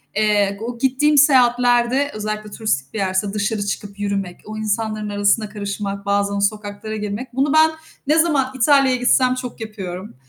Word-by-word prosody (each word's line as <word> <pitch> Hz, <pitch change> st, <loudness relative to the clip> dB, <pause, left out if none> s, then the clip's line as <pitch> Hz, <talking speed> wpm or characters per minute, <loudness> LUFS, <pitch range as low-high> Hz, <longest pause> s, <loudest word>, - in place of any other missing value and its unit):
eee, 205 Hz, -1 st, +2 dB
o 235 Hz, +1 st, -5 dB
gittiğim 270 Hz, +4 st, +2 dB
seyahatlerde, 250 Hz, -1 st, +4 dB
özellikle 215 Hz, 0 st, -5 dB
turistik 170 Hz, -12 st, -2 dB
bir -, -, -5 dB
yerse, 190 Hz, +1 st, -1 dB
dışarı 210 Hz, 0 st, -1 dB
çıkıp 200 Hz, 0 st, -5 dB
yürümek, 195 Hz, -3 st, -3 dB
o 215 Hz, 0 st, -7 dB
insanların 215 Hz, 0 st, -2 dB
arasına 205 Hz, +1 st, +1 dB
karışmak, 200 Hz, -1 st, -5 dB
bazen 200 Hz, 0 st, 0 dB
sokaklara 205 Hz, +1 st, -3 dB
girmek. 215 Hz, +4 st, -5 dB
Bunu 275 Hz, +3 st, +1 dB
ben 315 Hz, 0 st, +5 dB, 0.4 s
ne 305 Hz, +2 st, +3 dB
zaman 285 Hz, -6 st, +2 dB
İtalya'ya 265 Hz, 0 st, +4 dB
gitsem 255 Hz, +1 st, +3 dB
çok 250 Hz, -2 st, -7 dB
yapıyorum. 195 Hz, -4 st, -7 dB
215 Hz, 150 wpm, -20 LUFS, 200-250 Hz, 0.4 s, ben